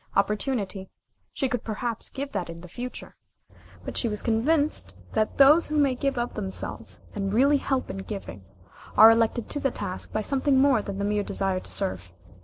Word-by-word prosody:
Opportunity 200 -1 -1 0.4
she 270 - -1
could 245 -3 -2
perhaps 230 +1 -3
give 280 +1 -5
that 175 - -3
in 165 0 -8
the 180 - -10
future, 245 +8 -8 0.7
but - - -5
she 240 - +2
was 210 -1 -3
convinced 285 +7 +1 0.2
that 215 0 0
those 295 +5 +7
who 305 - -1
may 280 -3 +3
give 275 +1 -1
of 240 0 -2
themselves, 195 -3 -5
and 195 -1 -2
really 275 +7 +4
help 270 -1 -1
in - - -6
the - - -4
giving, 195 - -7 0.5
are 220 +1 +10
elected 230 0 +1
to 290 - -1
the 275 - +1
task 185 -6 -5
by 215 - -1
something 275 +2 +2
more 265 -4 +4
than 200 -1 -6
the 200 - -1
mere 210 0 +1
desire 195 -2 -1
to - - -10
serve. 90 -1 -2
225 Hz, 195 wpm, -26 LUFS, 200-270 Hz, 0.7 s, are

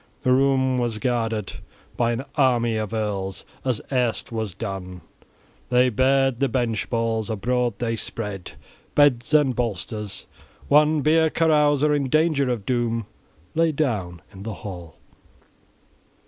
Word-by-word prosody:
The 130 - +2
room 130 -1 +2
was 120 -3 -1
guarded 115 -3 -2 0.4
by 120 -1 +1
an 120 +4 -3
army 120 -5 +2
of 110 -1 -2
earls, 100 -4 -3 0.2
as 130 -5 -1
erst 125 -4 0
was 110 -5 -3
done. 95 -4 -6 0.7
They 125 +1 +4
bared 135 +1 +2
the 140 - +2
bench 115 -3 -1
boards; 115 -1 -1
abroad 120 +2 0
they 115 -1 -1
spread 105 -4 -5 0.4
beds 140 -4 +3
and 145 -5 +4
bolsters. 105 -2 -4 0.4
One 150 +1 +5
beer 160 +2 +4
carouser 150 -2 +3
in 140 -3 0
danger 155 -2 +2
of 115 -5 -2
doom 115 -2 0 0.5
lay 165 0 +2
down 105 - -2
in 95 - -11
the 110 0 -5
hall. 90 -5 -8
120 Hz, 135 wpm, -23 LUFS, 110-135 Hz, 0.7 s, One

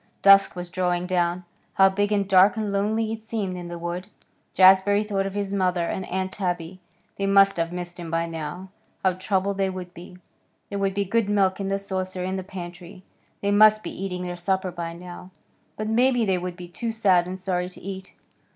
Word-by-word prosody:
Dusk 195 -1 +6
was 175 -1 -6
drawing 180 -1 0
down. 180 -1 0 0.3
How 195 0 +7
big 205 +2 0
and 200 -2 +1
dark 195 +3 +5
and 215 -2 -2
lonely 215 +3 0
it 225 - -7
seemed 215 -4 -3
in 175 -1 -7
the 175 0 -6
wood. 175 +2 -5 0.5
Jazbury 190 +2 +6
thought 195 -2 -1
of 195 - -7
his 200 -1 -2
mother 180 -3 +1
and 185 +2 -4
Aunt 190 +1 -2
Tabby. 180 -2 -3 0.4
They 195 - -1
must 195 -1 +5
have 165 0 -1
missed 175 0 -6
him 170 -1 -6
by 165 +1 0
now. 165 +3 -6 0.3
How 190 -1 +3
troubled 195 +1 -1
they 195 -1 +2
would 180 -1 -7
be. 180 +1 -12 0.5
There 200 - -2
would 195 -1 0
be 200 0 0
good 220 +1 0
milk 195 -2 +2
in 195 - -2
the 195 - +1
saucer 185 -2 -4
in 185 +1 -2
the 190 - -4
pantry. 180 0 -9 0.4
They 200 - 0
must 215 +1 +6
be - - -5
eating 180 -1 -5
their 175 0 -5
supper 190 +1 -1
by 170 -1 -5
now. 180 +1 -10 0.5
But 215 - -3
maybe 245 +1 +3
they 190 -3 +1
would 180 0 -5
be 175 0 -9
too 225 +7 -4
sad 190 -6 +3
and 185 +1 -6
sorry 180 -1 -2
to 185 - -11
eat. 190 0 -8
190 Hz, 210 wpm, -24 LUFS, 180-200 Hz, 0.5 s, How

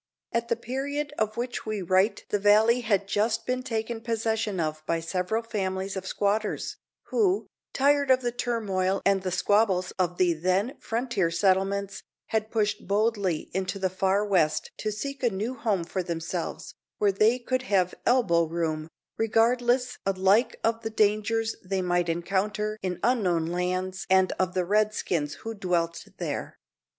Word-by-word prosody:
At 235 0 -1
the 235 - +1
period 280 +5 -3
of 215 0 0
which 245 +1 -3
we 215 -3 -2
write 185 +4 +2
the 205 - +1
valley 215 +4 +5
had 200 -4 +1
just 220 +3 0
been 255 0 -1
taken 225 -2 -3
possession 225 -3 -1
of 155 -1 -2
by 165 - +1
several 180 +7 -1
families 190 -3 -3
of 190 0 -5
squatters, 205 +2 -1 0.3
who, 400 -3 +2 0.3
tired 280 0 +3
of 260 0 +5
the 240 -1 -1
turmoil 195 -6 -1
and 195 -1 +3
the 185 - -2
squabbles 190 -1 +2
of 180 -1 0
the 180 -2 +3
then 185 - 0
frontier 230 -6 -1
settlements, 195 +3 +1 0.3
had 220 -1 0
pushed 215 -2 -1
boldly 200 -5 0
into 190 +2 -2
the 190 -1 -1
far 190 +2 +1
west 180 -7 +1
to 215 - -2
seek 275 +7 -5
a 245 - +3
new 215 +5 -3
home 210 -8 0
for 185 +3 -3
themselves, 170 0 -4 0.2
where 205 -1 +3
they 215 +5 +3
could 255 +1 -1
have 190 -7 +1
"elbow 190 -10 +3
room," 160 -1 -2 0.3
regardless 240 +3 +2
alike 195 +4 +2
of 225 0 +1
the 225 - -3
dangers 215 +1 +1
they 190 0 -1
might 175 -1 +1
encounter 205 +5 -1
in 180 -2 -3
unknown 195 -9 +2
lands 185 +2 -2
and 190 0 +4
of 185 -1 0
the 180 -1 +1
Redskins 200 -7 0
who 225 - -4
dwelt 170 -4 -1
there. - - -4
205 Hz, 160 wpm, -27 LUFS, 185-225 Hz, 0.3 s, valley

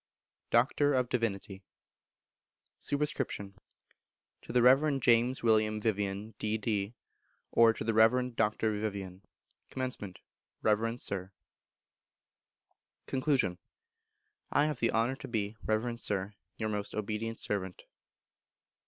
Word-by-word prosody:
Doctor 140 +4 +3
of 125 -2 +1
Divinity. 100 -5 -2 1.2
Sup. 145 - -2
To 130 -9 -2 1.0
the 125 - +3
Reverend 135 +1 +5
James 120 +2 +3
William 110 -1 +3
Vivian, 105 0 -2
D.D., 105 0 -1 0.6
or, 115 -1 +6
To - - -5
the 115 +1 0
Reverend 120 +3 +4
Dr. 110 0 +1
Vivian. 100 -3 -4 0.5
Comm. 125 -8 -4 0.5
Reverend 115 +3 +1
Sir. 95 -1 -3 1.7
Con. 130 -9 +1 0.9
I 145 - +4
have 150 -1 -2
the 115 - +2
honour 115 +4 +1
to - - -8
be, 110 -2 -2
Reverend 115 +2 0
Sir, 100 -2 -2 0.2
Your 110 - -2
most 105 -1 -3
obedient 110 +2 -3
servant. 95 -3 -3
110 Hz, 105 wpm, -31 LUFS, 105-125 Hz, 1.7 s, or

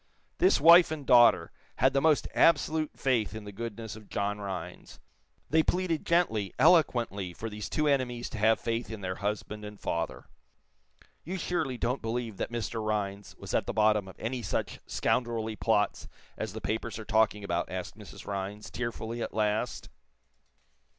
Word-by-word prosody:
This 370 +2 +4
wife 170 +1 +8
and 155 -3 -5
daughter 120 -10 +6 0.2
had 130 +2 +3
the 135 - +2
most 155 -1 +3
absolute 160 -2 +3
faith 120 -5 0
in 110 - -6
the 105 - -8
goodness 115 +1 -6
of 110 -2 -14
John 100 +1 -2
Rhinds. 90 -3 -7 0.5
They 160 +1 +5
pleaded 175 -1 -1
gently, 110 - +1
eloquently, 120 - +3
for 115 +5 -6
these 105 0 -6
two 155 0 0
enemies 125 -4 0
to 110 - -5
have 110 +1 +4
faith 115 +1 -2
in 110 -2 -7
their 95 -1 -4
husband 105 +1 -3
and 105 0 -9
father. 85 0 -3 1.0
"You 185 +4 -4
surely 155 -7 -2
don't 125 +3 -1
believe 115 -2 -3
that - - -3
Mr. 115 -1 -3
Rhinds 100 -2 -3
was - - -8
at - - +1
the - - -2
bottom 105 -2 +3
of 95 - -11
any 120 +2 -3
such 95 - -3
scoundrelly 115 -3 -1
plot 105 -1 0 0.3
as - - -5
the - - -6
papers 110 +2 -3
are 110 - -8
talking 105 -1 +2
about?" 85 -4 -2
asked 95 0 -5
Mrs. 105 -1 -12
Rhinds, 100 +1 -5
tearfully, 120 -1 -4
at - - -4
last. 105 -1 -1
110 Hz, 170 wpm, -29 LUFS, 105-125 Hz, 1.0 s, wife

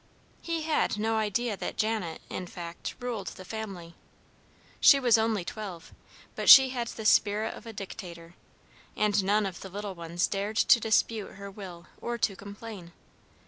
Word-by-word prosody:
He 330 -2 -3
had 310 -8 +1
no 220 +1 0
idea 220 +1 0
that - - -5
Janet, 215 -7 -1
in 180 - -5
fact, 170 -1 -7
ruled 240 -6 -4
the 185 - -8
family. 195 -6 -7 0.9
She 280 - +7
was 245 -4 +4
only 220 -4 +1
twelve, 195 -6 -7 0.4
but - - 0
she 265 -1 +11
had 245 -2 -3
the 220 -1 -7
spirit 210 0 +3
of - - -12
a - - -6
dictator, 175 -5 -9 0.6
and 210 -1 +2
none 205 +2 +2
of 185 -3 -5
the 190 - -8
little 200 +1 -5
ones 170 0 -1
dared 205 +2 -3
to 235 - +6
dispute 220 -1 0
her 200 0 -8
will 185 -4 -10 0.2
or 240 0 -3
to 205 -4 0
complain. 200 -3 -10
205 Hz, 165 wpm, -28 LUFS, 185-225 Hz, 0.9 s, she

